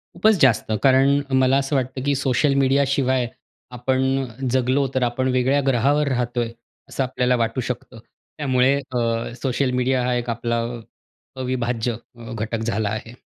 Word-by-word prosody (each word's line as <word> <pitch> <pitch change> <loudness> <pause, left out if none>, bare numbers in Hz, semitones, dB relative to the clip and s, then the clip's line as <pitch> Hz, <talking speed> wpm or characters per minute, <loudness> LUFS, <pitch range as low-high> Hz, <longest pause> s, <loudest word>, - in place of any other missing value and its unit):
खूपच 215 +5 +4
जास्त 115 -4 +3
कारण 135 +1 +5 0.2
मला 130 +1 +4
असं 140 +1 -1
वाटतं, 130 0 -2
की 140 0 +2
सोशल 135 +1 +1
मीडिया 135 +1 +3
शिवाय 130 -2 +1 0.5
आपण 130 +2 0 0.2
अ, 130 +1 -7
जगलो 130 +2 +2
तर 130 - +2
आपण 125 +2 0
वेगळ्या 130 +3 +2
ग्रहावर 140 +4 +2
राहतोय 120 -2 -1 0.4
असं 135 - -1
आपल्याला 125 0 +1
वाटू 115 +3 -2
शकतं. 125 -1 -6 0.4
त्यामुळे 130 -2 +2 0.2
अ, 115 -2 -1
सोशल 130 0 0
मीडिया 130 0 +1
हा 125 - +1
एक 120 0 -3
आपला 115 0 -1
अ, 120 0 -5 0.6
अविभाज्य 120 -2 -1 0.4
घटक 110 +1 -3
झाला 110 -2 -1
आहे. 110 +2 -5
130 Hz, 155 wpm, -22 LUFS, 120-135 Hz, 0.6 s, कारण